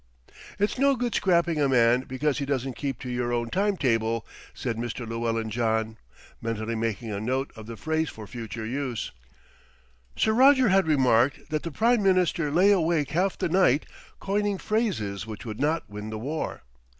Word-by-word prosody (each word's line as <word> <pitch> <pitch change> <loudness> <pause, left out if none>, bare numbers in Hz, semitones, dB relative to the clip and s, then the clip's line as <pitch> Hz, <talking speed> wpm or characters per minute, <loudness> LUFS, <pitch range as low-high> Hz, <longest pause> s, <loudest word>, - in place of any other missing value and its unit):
"It's 205 +5 0
no 275 0 +4
good 245 -2 -2
scrapping 170 -4 +2
a 140 - +3
man 125 0 +4
because 140 +3 -1
he 140 - -2
doesn't 135 -2 -1
keep 135 -1 -3
to 130 - -6
your 120 0 -1
own 120 -1 -1
time 200 0 +1
table," 115 -4 0 0.3
said 120 -3 -3
Mr. 120 +1 -4
Llewellyn 115 -1 -2
John, 110 -1 0 0.4
mentally 115 0 -3
making 115 0 -2
a 100 - -3
note 130 +4 -1
of 110 -1 -10
the 115 -1 -7
phrase 160 +7 -1
for 110 - -9
future 110 -1 -6
use. 130 0 -3 1.0
Sir 220 - +2
Roger 260 0 +6
had 190 -3 +3
remarked 130 -1 +2
that 155 -1 0
the 170 - -4
Prime 230 +7 +2
Minister 185 -5 +2
lay 180 +7 +4
awake 165 -6 +2
half 185 +4 +1
the - - 0
night 165 -5 +3 0.3
coining 205 0 0
phrases 115 - -1
which 110 +1 -8
would 110 -2 -6
not 160 +3 0
win 105 +1 -7
the 110 - -4
war. 145 - -4
135 Hz, 175 wpm, -26 LUFS, 115-175 Hz, 1.0 s, Roger